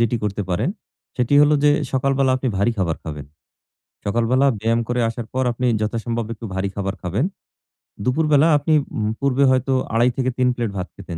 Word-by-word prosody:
যেটি 115 +1 +2
করতে 105 0 -2
পারেন, 90 - 0 0.5
সেটি 125 +3 +1
হলো 150 +1 +4
যে 150 - +6 0.2
সকালবেলা 135 0 +2
আপনি 130 0 -2
ভারী 100 +5 +2
খাবার 85 -4 0
খাবেন। 75 -3 -6 0.8
সকালবেলা 120 +6 +2
ব্যায়াম 115 +1 +1
করে 120 0 0
আসার 115 0 -5
পর 130 +1 0
আপনি 125 +2 -2
যথাসম্ভব 115 +1 -2
একটু 115 - -11
ভারী 95 +1 -1
খাবার 95 -1 -3
খাবেন। 95 - -1 0.8
দুপুরবেলা 150 +3 +3
আপনি 155 +2 0 0.2
উম 105 0 0
পূর্বে 140 0 +2
হয়তো 130 +1 +1 0.2
২.৫০ 120 +2 +3
থেকে 130 -1 +1
৩ 125 0 +2
প্লেট 115 -4 -2
ভাত 90 0 -3
খেতেন, 90 -4 -8
120 Hz, 175 wpm, -21 LUFS, 105-130 Hz, 0.8 s, যে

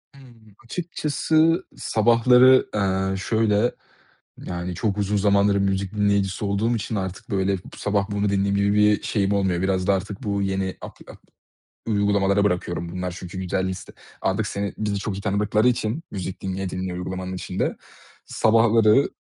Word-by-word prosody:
Hımm. 115 -6 -18
Açıkçası 160 +3 0
sabahları, 125 +3 +4
eee, 95 -1 0
şöyle, 110 +3 +1 0.7
yani 90 0 -4
çok 105 +2 -1
uzun 105 +1 0
zamandır 100 0 +3
müzik 100 0 -1
dinleyicisi 100 -1 0
olduğum 110 +4 0
için 110 +1 -4
artık 95 -1 -5
böyle 95 0 +1
b - - -13 0.2
sabah 105 0 -1
bunu 100 0 0
dinleyeyim 100 0 +1
gibi 100 +1 +2
bir 105 0 +3
şeyim 100 -2 0
olmuyor. 95 -3 0
Biraz 95 -1 0
da 100 - +4
artık 95 +1 -5
bu 100 -1 -1
yeni 95 -1 -2
apli - - -11
ap - - -16 0.7
uygulamalara 100 -1 +2
bırakıyorum, 85 -2 -1
bunlar 90 0 -3
çünkü 95 +1 -8
güzel 95 +1 -1
liste, 95 - -7 0.3
artık 95 +3 0
seni, 100 -1 -3
bizi 105 -2 -1
çok 100 -1 -4
iyi - - -5
tanıdıkları 105 +3 +1
için 120 +5 -1
müzik 95 -1 -5
dinleye 95 -1 -3
dinleye 90 -1 -4
uygulamanın 95 +1 -5
içinde. 90 - -3 0.5
Sabahları, 115 +2 +3
100 Hz, 155 wpm, -23 LUFS, 95-110 Hz, 0.7 s, sabahları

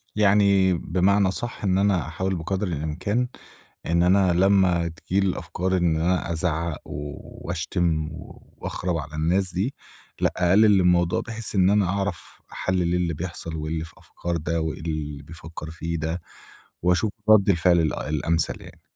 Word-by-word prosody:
يعني 100 -2 +4
بمعنى 95 +4 +2
أصح، 115 +5 -4
إن 95 -2 +2
أنا 100 -4 +2
أحاول 95 +4 -2
بقدر 95 +4 -2
الإمكان 90 - -1 0.6
إن 85 +1 +3
أنا 95 0 +4
لمّا 90 -2 +3
تيجي 85 +4 -2
لي 100 - +2
الأفكار 95 +1 -2
إن 85 -3 +2
أنا 85 +1 0
أزعق 85 -1 -1
و 75 0 -5 0.3
وأشتم 80 -2 -1
وأخرَب 85 +2 -5
على 75 0 -6
الناس 90 +5 +1
دي، 105 +10 -1 0.5
لأ - - +2
أقلل 100 +3 +5
الموضوع، 90 -1 +3
بحيّث 115 -2 -5
إن 95 -1 +4
أنا 105 -1 +3
أعرف 100 -2 -3
أحلِّل 90 -2 0
اللي 90 -2 0
بيحصل، 85 0 -5
وإيه 75 0 -3
اللي 80 0 -2
في 80 - -14
أفكار 85 -1 -4
ده 80 +1 -1
وإيه 80 +2 -3
اللي 75 -3 -4
بيفكر 80 +1 -9
فيه 85 +1 -4
ده، 80 +2 -3 0.6
وأشوف 90 +4 +2 0.2
رد 105 -2 +6
الفعل 85 -1 +4
ال 80 -2 +1
الأمثل 80 +2 -1
يعني. - - -14
90 Hz, 155 wpm, -24 LUFS, 80-95 Hz, 0.6 s, رد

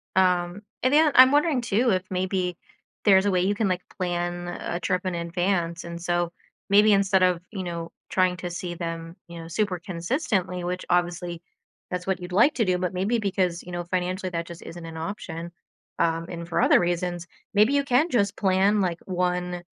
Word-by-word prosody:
Um, 180 0 +2 0.2
and 255 +3 +3
then 310 0 +5
I'm 255 +1 +9
wondering 295 -2 +3
too 235 +2 +1
if 185 -1 +1
maybe 185 -1 -1 0.5
there's 195 -2 +5
a 205 - +2
way 180 - +2
you 195 +3 +1
can, 220 -1 +1
like, 185 -1 0 0.2
plan 175 -1 -2
a 175 0 -4
trip 180 +2 -1
in 185 -1 -1
advance, 170 0 -1
and 170 0 -7
so 175 0 0 0.4
maybe 210 +1 +6
instead 195 -1 +3
of, 180 -2 +2
you 195 -4 -4
know, 170 -2 -5 0.2
trying 185 -1 +2
to 175 0 -5
see 175 0 -5
them, 165 -1 -5
you 170 0 -9
know, 165 - -9
super 185 +1 -1
consistently, 185 - -2
which 180 +1 -3
obviously 175 -1 0 0.5
that's 180 0 -4
what 190 -1 0
you'd 180 0 -7
like 235 +11 +5
to 230 - +1
do, 185 -1 +2
but 180 0 -2
maybe 195 +6 0
because, 185 -4 -1
you 180 - -10
know, 175 0 -3
financially, 185 +1 -2
that 170 -1 -3
just 170 0 -10
isn't 170 0 -9
an 165 0 -8
option. 170 -2 -5 0.5
Um, 165 0 +1
and 170 -1 -6
for 170 - 0
other - - +6
reasons, 175 0 -1 0.3
maybe 210 +6 +4
you 285 0 +3
can 275 +5 +2
just 205 - +1
plan, 195 +1 +3
like, 175 -2 -1
1 180 -1 -1
180 Hz, 195 wpm, -25 LUFS, 175-195 Hz, 0.5 s, I'm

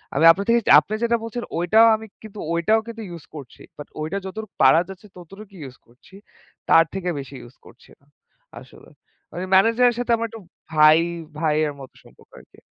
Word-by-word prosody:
আমি 165 - +2
আপনার 200 +4 -3
থেকে 235 0 +4 0.2
আপনি 215 - -8
যেটা 235 0 +1
বলছেন, 235 +1 -6
ওইটাও 215 +7 +4
আমি 220 0 -9 0.2
কিন্তু 215 -1 -11
ওইটাও 215 +7 +1
কিন্তু 230 -1 -8
ইউজ 170 -2 -10
করছি। 140 -5 -12 0.2
বাট 145 - -10
ওইটা 160 +6 -4
যতটুকু 215 +2 -8
পারা 135 +6 +5
যাচ্ছে, 195 +2 -12
ততটুকু 195 +4 -14
ইউজ 130 -2 -11
করছি। 125 +10 -21 0.5
তার 165 0 +6
থেকে 185 -2 -4
বেশি 135 0 -10
ইউজ 120 +2 -16
করছি - - -19 0.7
আসলে। - - -17 0.4
মানে 180 - -5
ম্যানেজারের 230 +5 +3
সাথে 245 -1 -2
আমার 230 0 -3
একটু 225 -1 -11 0.3
ভাই 155 +1 +5 0.4
ভাইয়ের 155 -2 0
মতো 130 - -13
সম্পর্ক - - -22
আর - - -19
কি। - - -19
190 Hz, 180 wpm, -21 LUFS, 155-220 Hz, 0.7 s, তার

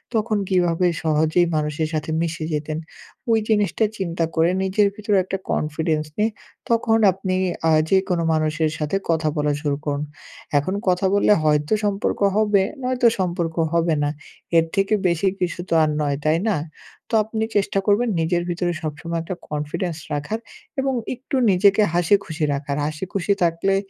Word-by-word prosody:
তখন 215 -1 +1
কিভাবে 180 -2 +2 0.2
সহজেই 160 +2 +2
মানুষের 150 +1 -1
সাথে 155 0 -2
মিশে 165 -1 -2
যেতেন? 150 +1 -2 0.5
ওই 225 - +4
জিনিসটা 210 0 +2
চিন্তা 170 -3 -1
করে 165 +1 +3
নিজের 195 +2 +3
ভিতরে 205 -1 0
একটা 190 +1 -3
কনফিডেন্স 155 0 -1
নিয়ে 215 +2 +2 0.4
তখন 230 -1 +3 0.2
আপনি 190 0 -2 0.3
আ - - +4 0.2
যেকোনো 190 -3 +2
মানুষের 155 0 0
সাথে 150 +4 -1
কথা 160 -2 +2
বলা 150 0 +1
শুরু 145 -2 -1
করুন। 145 0 -1 0.6
এখন 185 +7 -2
কথা 180 +1 +1
বললে 205 +1 +5
হয়তো 150 +2 +2
সম্পর্ক 200 0 -1 0.2
হবে, 210 -2 +3 0.2
নয়তো 250 -1 +2
সম্পর্ক 170 -3 -1 0.2
হবে 170 -1 +2
না। 145 - +1 0.5
এর 165 - +4
থেকে 195 +2 +1
বেশি 170 +2 +1
কিছু 180 -1 -2
তো - - 0
আর 155 - +2
নয়, 145 -2 0
তাই 155 +1 +3
না? 200 - +1 0.5
তো - - -13
আপনি 220 +1 -3
চেষ্টা 195 0 +1
করবেন 230 +4 +3
নিজের 175 +1 0
ভিতরে 175 0 -1
সবসময় 165 +2 -4
একটা 180 +3 -5
কনফিডেন্স 150 +3 -3 0.2
রাখার 145 +10 -2 0.4
এবং 270 0 0 0.2
একটু 260 +3 -5 0.2
নিজেকে 200 +3 +4
হাসিখুশি 175 -3 +1
রাখার। 140 0 -3
হাসিখুশি 180 +5 -1
থাকলে 170 +3 +1
175 Hz, 155 wpm, -22 LUFS, 155-200 Hz, 0.6 s, বললে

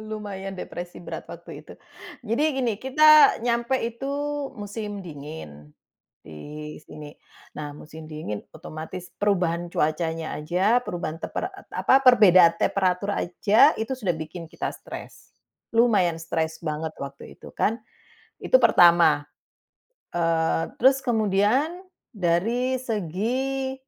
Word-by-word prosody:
Lumayan 195 -3 -6
depresi 175 -1 -7
berat, - - -7
waktu - - -10
itu. - - -14 0.5
Jadi 230 +6 0
gini, 245 -4 0
kita 305 +3 +6
nyampe 235 +2 +1
itu 235 +4 -5 0.5
musim 205 -1 -6
dingin, 140 - -10 0.5
di 150 - -9
sini. 150 -1 -11 0.4
Nah, 150 -1 -6
musim 155 +2 -11
dingin, 155 -10 -6
otomatis 175 +3 -9
perubahan 175 -4 0
cuacanya 160 +1 -1
aja, 185 +11 +1
perubahan 165 -5 -5
tempera - - -3
et 390 - -15
apa, 270 +1 +3
perbedaan 185 -9 +7
temperatur 195 +1 0
aja, 210 - +4
itu 225 +4 -2
sudah 210 -8 -1
bikin 165 +1 -8
kita - - -4
stres. - - -11 0.4
Lumayan 205 -8 +3
stres 160 0 -3
banget, 155 -1 -4
waktu 140 0 -9
itu, - - -12
kan. 225 +3 0 0.6
Itu - - +5
pertama. 170 - +5 0.9
Eee, 165 -1 +1
terus 265 +2 +4
kemudian, 225 - +1 0.3
dari 225 +8 0
segi, 250 +5 -2
185 Hz, 115 wpm, -24 LUFS, 160-235 Hz, 0.9 s, perbedaan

